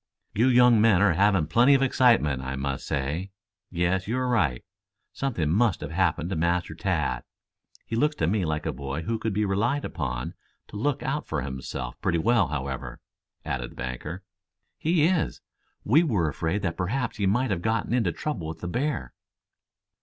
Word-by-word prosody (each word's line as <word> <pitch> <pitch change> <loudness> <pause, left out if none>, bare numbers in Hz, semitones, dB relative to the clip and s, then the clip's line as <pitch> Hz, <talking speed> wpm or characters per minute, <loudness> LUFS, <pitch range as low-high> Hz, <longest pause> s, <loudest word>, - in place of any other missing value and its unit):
"You 115 +5 +3
young 125 -3 +6
men 110 -5 +5
are 100 -4 +4
having 95 -1 +3
plenty 120 - +5
of 135 - +3
excitement, 115 - +3
I 65 0 -4
must 70 0 -3
say. 75 +8 -2 0.4
Yes, 90 +2 0
you 120 +4 -1
are 130 0 0
right. 80 - +1 0.5
Something 110 - -1
must 105 0 +2
have 75 - -5
happened 85 -1 0
to - - -1
Master 85 +2 0
Tad. - - -1 0.6
He 115 - -4
looks 150 +6 +2
to - - 0
me 95 +4 +1
like 80 -1 -2
a - - -1
boy 70 +3 -4
who 115 +6 -2
could 110 - -1
be 105 +2 0
relied 110 +9 0
upon 65 -6 -4 0.4
to - - -11
look 140 +6 -1
out 150 +3 -2
for 75 -5 -2
himself 65 -2 -6
pretty 85 - +1
well, 115 +2 +3
however," 70 -2 -4 0.5
added 60 -2 -3
the - - -16
banker. 65 +9 -5 0.6
"He 165 -1 +2
is. 175 -1 +1 0.4
We 140 +10 +5
were 105 - +1
afraid 80 +7 -2
that 85 -3 -2
perhaps 115 +7 -2
he 100 -2 +1
might 120 +5 +1
have 90 -3 -1
gotten 110 +2 0
into 115 -8 +2
trouble 90 - -4
with 80 0 -7
the 90 - -4
bear." 125 - -2
95 Hz, 185 wpm, -26 LUFS, 80-120 Hz, 0.6 s, young